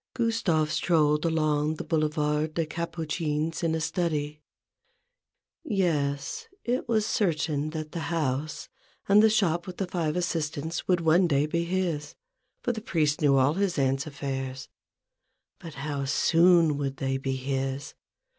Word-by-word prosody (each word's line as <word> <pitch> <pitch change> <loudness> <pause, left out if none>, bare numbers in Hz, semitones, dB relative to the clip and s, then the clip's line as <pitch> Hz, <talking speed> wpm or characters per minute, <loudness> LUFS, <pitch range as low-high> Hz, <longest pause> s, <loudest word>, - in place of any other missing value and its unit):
Gustave 195 -10 +1
strolled 150 -3 +2
along 155 -1 +1
the - - -5
Boulevard 150 -1 0
des 165 - +1
Capucines 160 -1 -3
in 165 -2 +1
a - - -1
study. 155 -2 -2 1.2
Yes; 175 - -1 0.2
it 245 0 -1
was 220 -2 +2
certain 155 -8 0
that 155 -1 -5
the 170 - -4
house, 155 -2 -2 0.4
and 205 +1 +6
the 220 - +6
shop 175 -5 +1
with 180 - -7
the 195 - -1
five 170 -4 -2
assist 165 -4 -1
ants, 160 +4 -4
would 180 -2 +2
one 170 +3 +4
day 145 -2 +2
be 170 +2 -1
his; 170 -4 -2 0.5
for 245 - +1
the 220 -2 -5
priest 155 -7 0
knew 140 -2 +4
all 135 +3 +4
his 190 -1 0
aunt's 135 +1 +1
affairs. 135 -2 -5 0.9
But 165 -4 -9
how 140 0 -3
soon 165 +1 +4
would 135 -1 -3
they 135 0 -1
be 135 0 -2
his 135 +1 -3
155 Hz, 145 wpm, -27 LUFS, 145-175 Hz, 1.2 s, and